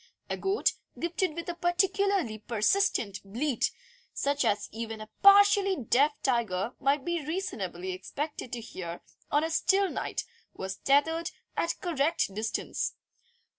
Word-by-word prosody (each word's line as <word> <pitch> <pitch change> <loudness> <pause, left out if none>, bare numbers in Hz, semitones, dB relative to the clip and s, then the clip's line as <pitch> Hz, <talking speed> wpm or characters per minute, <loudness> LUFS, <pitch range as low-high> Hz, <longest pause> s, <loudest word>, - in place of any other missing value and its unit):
A - - +1
goat, 390 +2 +1 0.3
gifted 340 -1 -1
with 340 +1 -5
a 345 - -2
particularly 350 - +1
persistent 225 - +1
bleat, 240 +7 0 0.5
such 285 0 +1
as 210 -3 +1
even 225 0 -5
a 215 0 -9
partially 400 -1 +7
deaf 280 +2 +3
tiger 235 -4 0
might 275 0 +1
be 345 -2 -1
reasonably 200 - -3
expected 255 +8 -5
to 240 - -3
hear 175 -6 -7 0.3
on 295 - +2
a 325 - -1
still 390 +4 +3
night, - - -3 0.3
was 190 0 -5
tethered 320 +5 +2 0.3
at 335 - 0
the 370 - -7
correct 285 -7 +1
distance. 220 +2 -2
285 Hz, 135 wpm, -29 LUFS, 220-345 Hz, 0.5 s, partially